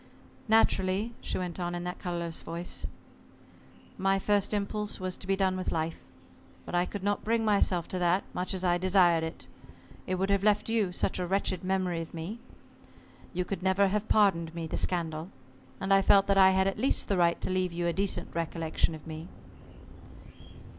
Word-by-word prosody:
"Naturally," 215 0 +2
she - - -3
went 180 -1 -4
on 175 0 -2
in 175 - -4
that 180 +1 -5
colorless 170 -2 -3
voice, 170 +1 -3 1.1
"my 195 +1 +2
first 205 0 +1
impulse 210 0 -2
was 185 -1 -2
to 190 - -11
be 195 - +2
done 190 -1 +1
with 185 - -3
life. 165 0 -2 0.7
But - - -8
I 175 +1 +2
could 200 -2 -6
not 205 0 0
bring 225 0 +1
myself 200 -5 +2
to 185 - -3
that, 175 +2 +2
much 180 +2 -2
as 185 - -3
I 175 -1 +2
desired 180 -3 +4
it. 160 +1 -5 0.6
It 185 - 0
would 195 +2 0
have 200 -1 +2
left 210 +1 +2
you 220 -5 +1
such 185 - -1
a 180 - -2
wretched 190 -1 0
memory 185 -2 0
of 165 - -9
me. 175 +8 -5 0.9
You 180 0 -2
could 190 -1 -4
never 190 +1 +3
have 210 +2 -1
pardoned 170 -6 +3
me 165 -1 -4
the 160 - -4
scandal 165 -1 0 0.5
and 195 +1 +1
I 195 - +6
felt 195 0 +5
that 200 - +2
I 190 -1 +8
had 190 0 +3
at 195 - -1
least 265 - +1
the 200 - +1
right 170 -1 +3
to - - -3
leave 185 -1 0
you 170 0 -3
a 170 - +1
decent 195 +1 -1
recollection 165 -1 -1
of 155 - -13
me." 160 +1 -7
185 Hz, 195 wpm, -29 LUFS, 170-195 Hz, 1.1 s, I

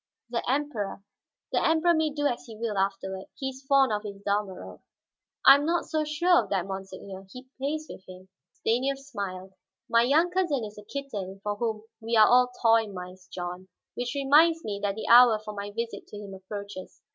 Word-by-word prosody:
"The 235 - 0
Emperor 255 -8 -2 0.2
" - - -65
"The - - +1
Emperor 325 +2 +4
may 315 -1 +2
do 290 0 -3
as 250 -4 -1
he 225 -2 -11
will, 225 -2 -3
afterward. 195 -1 -2
He 265 - -2
is 265 0 -10
fond 270 -4 +5
of 210 - -1
his 205 -2 -7
Dalmorov." 200 -2 -3 0.6
"I 270 - +11
am 280 +1 +2
not 340 +2 0
so 310 -1 -1
sure 340 +4 +3
of - - -12
that, 190 -3 0
monseigneur; 190 0 -8
he 255 +3 -11
plays 305 +3 -2
with - - -10
him." 185 0 -12 0.2
Stanief 260 +5 0
smiled. 195 -9 -6 0.3
"My 230 - +4
young 305 +8 +3
cousin 345 -9 0
is 210 0 -10
a - - -12
kitten 205 -8 -6
for 205 0 -1
whom 220 -1 -2 0.2
we 230 +1 0
are 215 - +8
all 250 +1 +5
toy 225 -1 +5
mice, 180 -1 -9
John. 180 +1 -6 0.3
Which 245 +2 -4
reminds 310 +4 +4
me 205 -1 -4
that 200 -1 -1
the 220 - -5
hour 240 -1 +8
for 215 0 -8
my 200 0 -5
visit 230 +3 -5
to 210 - -10
him 205 -1 -8
approaches." 195 0 -8
225 Hz, 200 wpm, -27 LUFS, 195-275 Hz, 0.6 s, I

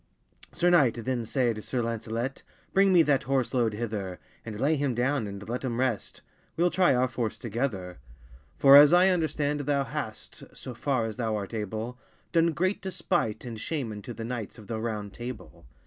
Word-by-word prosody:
Sir 175 +1 +2
knight, 140 -9 +5
then 120 0 -2
sayd 120 -5 0
Sir 120 +3 -2
Lancelett, 115 +3 -3 0.3
Bring 195 0 +5
me 175 -3 +6
that 145 -3 +2
horse 135 -1 0
load 115 -4 +1
hither, 105 -5 -4 0.3
And 110 -2 -7
lay 145 +5 +2
him 140 -4 -1
downe, 125 -1 0
and 100 0 -8
let 120 +3 -3
him 120 -2 -2
rest; 125 -5 -2 0.4
Weel 175 +1 +3
try 180 -8 +4
our 125 +1 +2
force 120 -3 -3
together: 105 - -3 0.6
For, 140 0 +8
as 145 +3 +9
I 180 +2 +6
understand, 150 -4 0
thou 140 -1 +1
hast, 135 -6 -6 0.2
So 130 - -7
far 125 -1 0
as 110 0 -5
thou 110 -3 -1
art 100 +1 -5
able, 110 +3 -4 0.3
Done 165 -1 +3
great 185 +5 0
despite 175 - -1
and 115 -3 -6
shame 140 -3 -3
unto 105 +3 -7
The 115 0 -6
knights 120 -2 -5
of 110 - -12
the 110 +1 -4
Round 105 -3 -4
Table. 120 - -8
125 Hz, 185 wpm, -28 LUFS, 110-145 Hz, 0.6 s, as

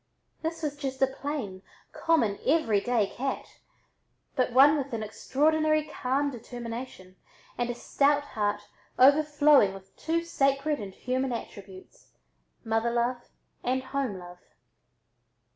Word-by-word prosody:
This 330 0 -4
was 290 -2 -2
just 270 -2 -5
a - - +8
plain, 265 -8 -5 0.3
common 305 -12 +1
everyday 240 -6 +2
cat, 265 +7 -5 0.8
but 255 -2 +1
one 275 +4 +7
with 275 -3 -3
an 220 -1 -2
extraordinary 310 +7 +1
calm 285 -1 -1
determination 235 -5 -8 0.4
and 240 0 -2
a 240 - -2
stout 285 +3 +2
heart 210 -5 -2 0.4
overflowing 290 -5 +5
with 190 0 -14
two 335 +1 -1
sacred 275 -2 +1
and 195 -3 -7
human 255 +1 -2
attributes, 195 -5 -9 0.5
mother 225 +1 0
love 240 +1 -1 0.3
and 260 +1 0
home 270 -8 -2
love. 175 0 -11
260 Hz, 120 wpm, -28 LUFS, 225-290 Hz, 0.8 s, a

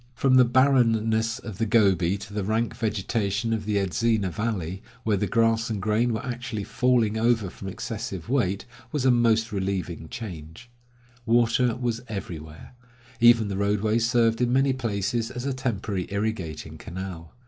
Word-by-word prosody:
From 135 +2 +2
the 130 -1 +7
barrenness 115 -4 +3
of 105 -5 -9
the 115 - +1
Gobi 95 -4 +3
to 100 +1 -10
the 105 -1 -2
rank 110 +3 0
vegetation 110 0 -1
of 110 -2 -2
the 105 -1 -1
Edzina 100 +1 +1
valley, 95 -3 -3 0.2
where 110 -2 +2
the 100 +1 0
grass 115 -1 +2
and 110 -3 -2
grain 110 +4 +1
were 110 - -3
actually 120 -4 -4
falling 115 -1 +1
over 115 -5 +2
from 95 - -9
excessive 100 -3 -5
weight, 100 -7 0 0.3
was 145 -4 -1
a 130 - +6
most 115 -1 +2
relieving 95 -5 -3
change. 90 0 -8 0.6
Water 120 +1 +3
was 120 -2 -2
everywhere. 80 -6 -7 0.5
Even 120 -2 +6
the 100 -1 -3
roadway 105 +2 +1
served 115 0 +2
in 120 0 +2
many 135 +1 +3
places 115 -2 -2
as 125 0 -6
a 140 - 0
temporary 105 -7 -2
irrigating 100 -6 -4
canal. 90 -3 -7
110 Hz, 160 wpm, -25 LUFS, 100-120 Hz, 0.6 s, the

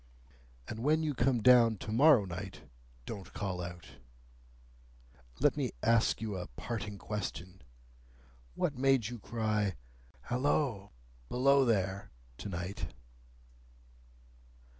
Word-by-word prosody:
"And 110 - -6
when 155 +6 +2
you 150 -2 0
come 120 -2 +1
down 120 -3 +6
to 105 - -6
morrow 130 -2 +6
night, 95 +1 -7 0.4
don't 100 -4 -7
call 95 -3 -3
out! 85 -1 -7 1.5
Let - - +3
me - - -2
ask 115 -1 +3
you 110 -3 -3
a 90 - -5
parting 105 - -5
question. 95 -2 -5 0.9
What 145 - 0
made 130 -3 +2
you 120 -1 -7
cry, 105 -3 -1 0.5
'Halloa! 125 -5 0 0.4
Below 135 +2 +4
there!' 95 -4 0 0.3
to 105 - -5
night?" 90 +2 -4
110 Hz, 110 wpm, -32 LUFS, 95-125 Hz, 1.5 s, down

